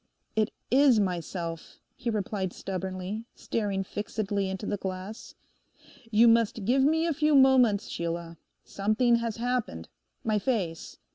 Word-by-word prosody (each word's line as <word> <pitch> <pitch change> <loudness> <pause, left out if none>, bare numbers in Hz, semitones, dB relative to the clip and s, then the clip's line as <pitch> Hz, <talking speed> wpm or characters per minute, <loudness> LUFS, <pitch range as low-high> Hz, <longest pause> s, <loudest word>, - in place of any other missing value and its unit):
'It 215 -1 +2 0.2
is 265 -3 +5
myself,' 170 -3 -3 0.2
he 250 -2 -3
replied 200 -3 -2
stubbornly, 190 +2 -4
staring 200 -3 -2
fixedly 205 -1 -3
into 190 +2 -4
the 205 - -1
glass. 190 +4 -6 0.7
You 225 +2 +5
must 230 -2 +3
give 255 +5 +3
me 320 +3 +3
a 335 - +1
few 300 +1 +2
moments, 250 -6 +5
Sheila. 170 0 -4 0.3
Something 215 +4 +2
has 230 -2 -3
happened. 240 - -2 0.3
My 215 -2 +1
face. 190 -8 -2
210 Hz, 130 wpm, -28 LUFS, 190-235 Hz, 0.7 s, is